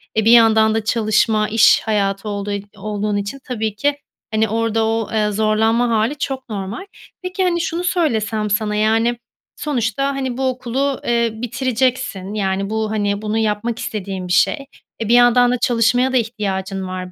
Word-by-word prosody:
eee, 220 -1 +1
bir 230 - +6
yandan 220 -2 +5
da 225 - 0
çalışma 215 -1 +1
iş 225 +1 +5
hayatı 200 -1 -1
olduğu 205 0 -4
ol 200 - -2 0.2
olduğun 210 -1 -2
için 205 +7 -4
tabii 220 -5 -3
ki, 285 +6 0 0.4
hani, 220 0 +2
orada 225 0 0
o, 225 0 -1
eee, 210 -1 +1
zorlanma 220 +3 +2
hâli 230 +6 0
çok 265 -3 -4
normal. 205 - -5 0.4
Peki, 370 +1 -2
hani, 345 -2 +1
şunu 335 +1 -2
söylesem 225 - 0
sana, 210 0 0
yani, 225 +3 +2 0.4
sonuçta, 270 -2 -1
hani, 260 -2 -3
bu 265 0 0
okulu, 260 +2 -2
eee, 235 -1 +2
bitireceksin, 245 -4 -2
yani 195 -1 -1
bu, 220 0 -2
hani, 205 -1 -1
bunu 215 +1 -2
yapmak 220 +2 -1
istediğin 195 -3 -5
bir 180 - -1
şey. 275 +8 +2 0.3
Eee, 225 - -3
bir - - +4
yandan 245 0 +5
da 250 - +1
çalışmaya 245 +2 +2
da 255 - +4
ihtiyacın 195 -4 -3
var, 185 0 -6
220 Hz, 170 wpm, -19 LUFS, 210-245 Hz, 0.4 s, bir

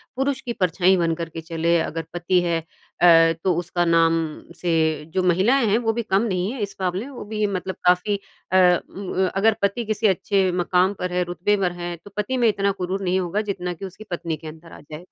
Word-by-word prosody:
पुरुष 270 0 -1
की 240 -3 -4
परछाई 185 -1 +2
बन 165 -1 +1
कर 165 -1 -5
के 165 - -7
चले, 165 +1 0
अगर 165 0 -3
पति 175 +1 +1
है 170 -2 -1 0.4
अ, 165 -1 +7
तो 185 - +2
उसका 175 0 -1
नाम 165 -1 +4 0.4
से 175 0 -1 0.4
जो 190 - +1
महिलाएँ 195 +9 +3
हैं 210 +2 +3
वो 225 -2 0
भी 235 - -1
कम 195 -2 +1
नहीं 190 -3 -1
हैं 260 - -6
इस 200 -1 -4
मामले 185 +4 -1
में 280 - -10
वो - - -7
भी 215 0 -1
मतलब 190 -1 -3
काफ़ी 180 +3 +3 0.3
अ, 185 - +4 0.3
उम, 195 -1 -7
अ, - - +1
अगर 220 +3 +4
पति 200 +4 0
किसी 215 0 +1
अच्छे 190 0 +1
मकाम 180 +2 +2
पर 180 0 -3
है 180 0 +1
रुतबे 175 +4 0
पर 185 -3 0
है 175 0 -4
तो 205 - -12
पति 210 +5 -1
में 240 -2 +3
इतना 200 -1 +1
गुरूर 185 +2 -2
नहीं 185 0 +1
होगा 185 +3 -1
जितना 180 -2 -4
कि 185 +3 -8
उसकी 190 +3 -10
पत्नी 165 -2 -3
के 155 - -11
अंदर 160 +2 -11
आ - - -11
जाएगा। 150 - -6
185 Hz, 230 wpm, -23 LUFS, 175-205 Hz, 0.4 s, अ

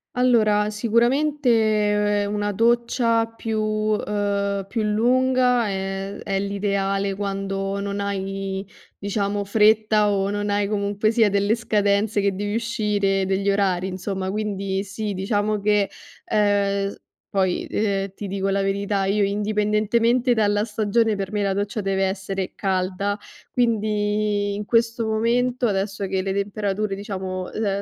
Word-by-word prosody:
Allora, 215 -4 +3
sicuramente 220 -4 +2
una 205 0 -1
doccia 230 +1 +2
più 225 -1 -4
uhm, 205 -2 -1
più 225 +2 -2
lunga 250 +2 +2
è 195 0 -3
è 195 -1 -1
l'ideale 200 0 -1
quando 195 0 -3
non 200 0 -3
hai, 195 0 -3 0.3
diciamo, 200 0 -1
fretta 215 0 +3
o 200 0 0
non 205 0 -2
hai 205 0 +1
comunque 205 +1 0
sia 225 -2 +4
delle 200 +2 +2
scadenze 205 -2 +1
che 200 0 +1
devi 205 +2 -2
uscire, 210 -4 0
degli 195 +1 +1
orari 190 -2 +1
insomma. 190 0 -3
Quindi 195 -2 -2
sì, 205 +1 -4
diciamo 205 +2 0
che, 205 -1 +2 0.4
uhm, 200 -1 +2
s - - -11 0.3
poi, 190 -2 0
ehm, 195 -2 -1
ti 205 - -6
dico 195 0 -2
la 195 0 +1
verità, 200 0 0
io 205 +2 +1
indipendentemente 215 +4 +1
dalla 205 -2 +2
stagione 220 0 +1
per 195 0 -4
me 210 -1 0
la 195 - +1
doccia 205 +2 -2
deve 195 0 0
essere 190 0 -3
calda, 195 +1 -1 0.3
quindi 210 -3 0
in 205 0 -4
questo 230 0 +1
momento, 240 +3 +1
adesso 195 -1 -2
che 190 0 -1
le 195 - -1
temperature, 200 0 -2
diciamo, 190 -2 -4
uhm, 200 -2 -1
205 Hz, 135 wpm, -23 LUFS, 195-215 Hz, 0.4 s, sia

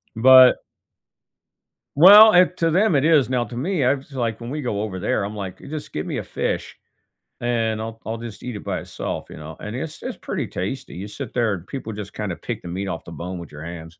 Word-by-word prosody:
but 130 +2 +7 1.3
Well 205 +7 +10
and 180 0 +5
to 165 -1 +1
them 185 -1 +3
it 140 - +2
is, 150 -7 +4
now 125 -2 +1
to 110 - -9
me, 155 +5 -1
I 130 +2 +4
was, 140 +1 -9
like 115 -3 -2
when 115 - -6
we 150 +3 -4
go 105 -6 -2
over 95 -4 -4
there, 100 +1 0
I'm 105 +2 -5
like, 95 -2 -6
"Just 150 +1 -8
give 75 - -3
me - - -3
a - - -3
fish," - - -3 0.7
and 115 -2 0
I'll 115 0 -6
I'll 110 +2 -3
just 115 -2 -9
eat 125 -3 -5
it 105 - -7
by - - -3
itself, - - -5
you - - -9
know? 80 +1 -9
And 105 +2 -6
it's 150 +4 -6
it's - - -5
pretty - - -4
tasty, 100 +9 -5
you 95 +4 -6
sit 130 +3 -8
there 115 -4 +1
and 90 -1 -6
people 130 -5 -6
just 105 -2 -7
kinda - - -4
pick - - -6
the - - -9
meat 95 +3 -4
off 85 - -4
the - - -10
bone 90 +2 -6
with 85 - -10
your 75 +1 -9
hands. 80 -1 -8
115 Hz, 240 wpm, -22 LUFS, 100-135 Hz, 1.3 s, Well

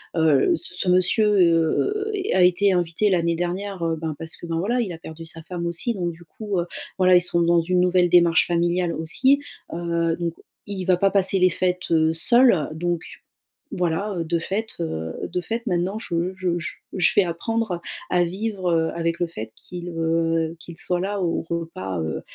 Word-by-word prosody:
heu - - +1
heu, 160 - +4
ce 320 - -3
ce 180 - -2
monsieur, 185 +4 +3
heu 180 - +2
est 395 -1 -2
a 185 - +5
été 185 +2 +4
invité 175 +4 +1
l'année 170 -2 +1
dernière, 180 +2 -3
heu, 165 -1 0
ben 160 -2 -3
parce 165 0 -6
que, - - -9
ben, 165 -1 -2
voilà, 240 +7 0
il 205 -6 -3
a 165 - -7
perdu 165 0 -9
sa 165 0 -2
femme 175 0 -5
aussi 170 +8 -1
donc 175 -3 -2
du 170 +1 -15
coup, 205 +1 -4
heu, 170 - -1 0.3
voilà 185 0 +6
ils 175 - +6
sont 170 -1 0
dans 170 0 +4
une 180 +2 +1
nouvelle 180 -1 +3
démarche 170 -1 +5
familiale 175 0 +1
aussi. 260 - +2 0.3
Heu, 170 -1 0
donc 170 -1 -2 0.3
il 200 -2 -4
va 185 - +4
pas 195 +1 +3
passer 195 -1 +3
les 185 0 +5
fêtes, 180 +1 -1
heu, 160 -1 +3
seul. 235 - +4
Donc 175 +1 -2 0.7
voilà, 180 +4 -1
heu, 170 - -1
de 170 +1 0
fait, 205 +6 -2
heu, 80 - -3 0.2
de - - -1
fait, 230 +5 -4
maintenant 185 +2 0
je 175 -2 -2
je 185 -1 -1 0.4
je 185 - +2
vais 200 - +6
apprendre 185 +2 -2 0.3
à 175 -1 +3
vivre, 190 +1 -3
heu, 160 -1 +2
avec 165 0 -1
le 175 - 0
fait 110 -9 -7
qu'il, 175 -1 -9
heu, 165 0 0
qu'il 165 0 -11
soit 180 +1 -2
là 200 +1 -2
au 170 -2 0
repas, 130 - -4
heu, 80 0 -3
175 Hz, 200 wpm, -23 LUFS, 165-190 Hz, 0.7 s, voilà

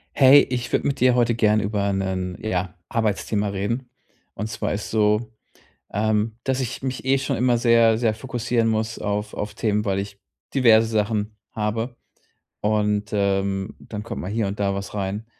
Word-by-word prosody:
Hey, 140 +1 +8
ich 120 -2 -2
würde - - +1
mit 140 - 0
dir 125 0 +4
heute 120 -1 +3
gern 110 -2 +3
über 100 -1 0
'nen, 95 -2 -2
ja, 90 -4 -2
Arbeitsthema 105 -2 0
reden. 105 +6 -3 0.5
Und 105 - -3
zwar 110 - -3
ist 105 +1 -4
so, 110 +1 +2 0.6
ähm, 110 +1 0
dass 130 0 0
ich 130 0 -4
mich 130 0 -4
eh 135 +1 +4
schon 135 0 -1
immer 125 0 +3
sehr 115 -1 +4
sehr 115 -1 +1
fokussieren 120 0 -1
muss 110 +1 -1
auf 105 +1 -2
auf 105 0 -5
Themen, 105 0 0
weil 95 -1 +1
ich 100 0 -6 0.3
diverse 115 -4 +5
Sachen 105 -1 -1
habe 115 +3 -2 0.6
und, 105 0 +1
ähm, 95 -1 0
dann 105 -1 -7
kommt 115 - -6
mal 90 - -4
hier 110 -1 0
und 100 +1 -5
da 100 -1 +1
was 100 0 -5
rein. 100 +2 -3
110 Hz, 175 wpm, -23 LUFS, 100-115 Hz, 0.6 s, Hey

